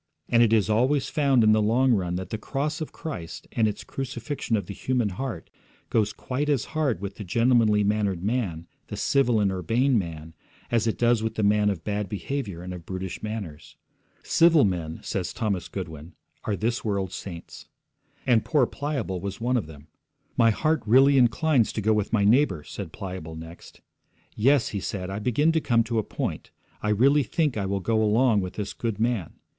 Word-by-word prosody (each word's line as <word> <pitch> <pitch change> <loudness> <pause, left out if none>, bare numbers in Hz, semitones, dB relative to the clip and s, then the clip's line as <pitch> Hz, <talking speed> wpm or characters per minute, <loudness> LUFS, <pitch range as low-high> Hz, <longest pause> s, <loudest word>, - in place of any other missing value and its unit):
And 115 - +4
it 115 -2 +4
is 110 -4 +3
always 125 +6 +2
found 140 -5 +3
in 110 - +5
the 110 0 +4
long 120 +4 +3
run 90 -4 0
that 95 0 -5
the 110 - -3
cross 150 +7 -3
of 155 - -4
Christ 140 - -7
and 110 -2 +2
its 105 - -4
crucifixion 125 -2 -3
of 100 - -3
the 100 - -7
human 125 -1 0
heart 100 -3 -5 0.4
goes 105 -2 +2
quite 140 +4 -3
as 140 -6 +1
hard 150 -9 0
with 100 -1 -6
the 105 - -6
gentlemanly 115 +1 +3
mannered 100 -3 0
man, 100 -7 -1 0.2
the - - -6
civil 125 -5 +2
and 100 -2 +2
urbane 115 - +1
man, 80 -3 -7 0.4
as 115 -1 +2
it 110 - 0
does 120 -1 +3
with 110 0 -2
the 110 - -1
man 105 0 +3
of 90 -5 -3
bad 105 -1 -2
behaviour 105 -4 -4
and 90 0 -6
of 90 -2 -8
brutish 95 0 -5
manners. 105 -9 -6 0.5
'Civil 165 -5 +5
men,' 85 -4 -2
says 90 -3 -3
Thomas 100 -6 -2
Goodwin, 80 +1 -7 0.3
'are 105 - 0
this 115 +4 -1
world's 100 -4 -2
saints.' 85 -4 -8 0.6
And 115 -4 +3
poor 145 -5 +3
Pliable 135 - -3
was 100 +1 -5
one 125 +2 0
of 115 -10 0
them. 75 -2 -13 0.5
'My 115 - +5
heart 155 +7 +1
really 135 +4 +6
inclines 125 +1 +3
to - - -2
go 110 +2 +3
with 105 -1 -1
my 105 -3 +2
neighbour,' 105 - +3
said 95 -1 -7
Pliable 90 -5 -7
next. 80 +1 -11 0.5
'Yes,' 135 +3 +3
he 100 - -3
said, 95 -1 -4
'I 100 - -3
begin 125 +9 +2
to 160 -1 +1
come 115 -4 +3
to 115 0 -1
a - - -1
point. - - -4 0.3
I 105 - -1
really 135 +8 +4
think 150 0 0
I 100 -3 -2
will 100 0 -1
go 110 +3 +1
along 110 0 +3
with 90 0 -5
this 105 -1 -4
good 115 -3 -3
man. 115 -7 -1
110 Hz, 195 wpm, -26 LUFS, 95-125 Hz, 0.6 s, really